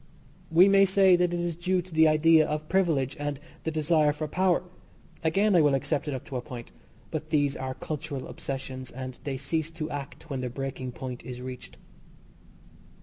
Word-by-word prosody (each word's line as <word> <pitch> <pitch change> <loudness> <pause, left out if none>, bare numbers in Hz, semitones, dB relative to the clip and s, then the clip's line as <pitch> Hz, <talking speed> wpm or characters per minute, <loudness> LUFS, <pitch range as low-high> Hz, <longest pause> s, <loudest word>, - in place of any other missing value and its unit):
We 175 +4 +7
may 195 0 +6
say 190 -1 +5
that 175 0 +2
it 175 - -1
is 170 -1 -2
due 180 +2 0
to 180 -1 -14
the 160 0 +6
idea 155 0 +5
of 150 0 -3
privilege 155 -8 +1
and 145 -1 -3 0.3
the - - +1
desire 155 -1 +3
for 155 +1 -4
power. 180 +3 +2 0.6
Again, 195 +5 +3
I 170 - +7
will 145 -2 +4
accept 145 +2 -1
it 145 - -1
up 130 - -7
to 135 -4 -4
a - - -3
point 120 -3 -9 0.4
but 155 -1 -4
these 145 -3 +2
are 130 0 -4
cultural 150 -3 -5
obsessions, 130 -1 -5
and 130 0 -7
they 135 -2 -2
cease 155 +4 -2
to 160 -1 -5
act 145 +2 -7
when 135 -4 -3
the 125 - -2
breaking 130 0 -5
point 125 -1 -6
is 125 0 -7
reached. 125 - -8
150 Hz, 195 wpm, -28 LUFS, 135-165 Hz, 0.6 s, We